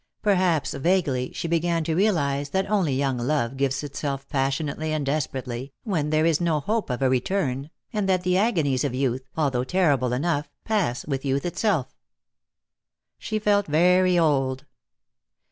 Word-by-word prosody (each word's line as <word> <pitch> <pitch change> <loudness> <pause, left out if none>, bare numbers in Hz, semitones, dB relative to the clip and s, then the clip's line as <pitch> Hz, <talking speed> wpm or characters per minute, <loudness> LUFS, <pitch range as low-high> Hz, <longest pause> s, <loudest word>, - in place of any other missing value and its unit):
Perhaps, 185 -7 +2
vaguely, 140 -6 0
she - - -4
began 170 0 +1
to 160 - -1
realize 145 -7 +1
that 190 +5 0
only 180 -10 +2
young 135 -2 0
love 125 -1 0
gives 135 +1 -1
itself 140 -1 -4
passionately 140 +3 -1
and 150 -2 -1
desperately, 135 -2 -3
when 165 -10 -1
there 155 +1 +2
is 165 -1 +2
no 165 -3 +1
hope 215 +7 -1
of 125 +2 -2
a - - +4
return, 135 +1 -1 0.2
and 205 -3 0
that 185 -1 +2
the 180 0 +1
agonies 165 - +1
of 135 -4 -1
youth, 130 0 -1
although 135 -5 +1
terrible 140 -6 +2
enough, 145 +3 -1 0.2
pass 200 - 0
with 135 -3 -3
youth 135 +1 -1
itself. 175 - -1 1.2
She 215 - -3
felt 205 -1 +2
very 180 +4 +4
old. 135 -5 +1
150 Hz, 155 wpm, -25 LUFS, 135-180 Hz, 1.2 s, a